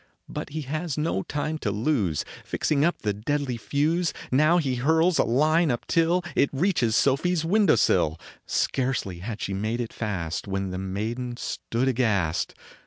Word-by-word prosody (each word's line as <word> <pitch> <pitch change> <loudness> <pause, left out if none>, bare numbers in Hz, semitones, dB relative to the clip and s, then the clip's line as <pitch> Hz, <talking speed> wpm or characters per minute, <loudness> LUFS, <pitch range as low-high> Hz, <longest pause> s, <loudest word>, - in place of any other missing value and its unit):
But - - -5
he 155 +2 -4
has 155 +2 -3
no 150 -10 0
time 155 +6 -3
to 105 - -1
lose; 105 - 0 0.2
Fixing 145 -2 0
up 170 -4 0
the 105 -2 +1
deadly 130 +5 -2
fuse, 155 +8 0 0.2
Now 155 +6 +4
he 135 -7 0
hurls 160 +6 +3
a - - +6
line 155 +7 +3
up 120 -2 -1
till 170 +1 +2
It 140 - +3
reaches 135 - +1
Sofie 140 +9 +2
s 165 -2 0
window 200 0 +4
sill. 80 +1 +2 0.3
Scarcely 125 -9 -1
had 110 +3 -5
she 95 - -2
made 110 +5 -2
it 115 -2 -4
fast 90 -8 -3
When 95 -1 -2
the 90 - -4
maiden 115 +6 -3
stood 120 +1 -2
aghast 105 -10 +1
130 Hz, 170 wpm, -26 LUFS, 105-155 Hz, 0.3 s, a